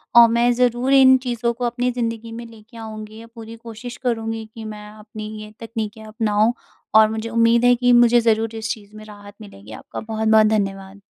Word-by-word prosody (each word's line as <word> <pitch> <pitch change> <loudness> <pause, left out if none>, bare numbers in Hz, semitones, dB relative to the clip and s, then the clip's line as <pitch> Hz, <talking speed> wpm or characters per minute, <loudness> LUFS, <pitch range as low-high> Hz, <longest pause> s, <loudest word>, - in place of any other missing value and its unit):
और 235 0 +9
मैं 235 +1 +2
ज़रूर 250 +2 +1
इन 260 -1 +7
चीज़ों 240 -1 -1
को 245 +1 -4
अपनी 245 +1 -1
ज़िंदगी 230 -2 -4
में 235 +1 -8
लेके 230 +1 -16
आऊँगी 215 -1 -9
अ, 230 - -13
पूरी 225 0 -10
कोशिश 230 +1 -10
करूँगी 225 -2 -2
कि 225 - -8
मैं 210 -1 -8
अपनी 215 0 -10
ये 215 0 -10
तकनीकें 220 -1 -6
अपनाऊँ, 215 +1 0 0.4
और 220 0 +7
मुझे 220 +1 -4
उम्मीद 230 +1 +3
है 245 0 +5
कि 245 0 +2
मुझे 240 0 +5
ज़रूर 225 0 0
इस 220 0 -4
चीज़ 210 -2 -16
में 215 0 -11
राहत 205 -1 -13
मिलेगी। 105 - -13
आपका 110 - -8
बहुत-बहुत 220 -1 +2
धन्यवाद। 195 -2 -3
225 Hz, 195 wpm, -20 LUFS, 215-235 Hz, 0.4 s, और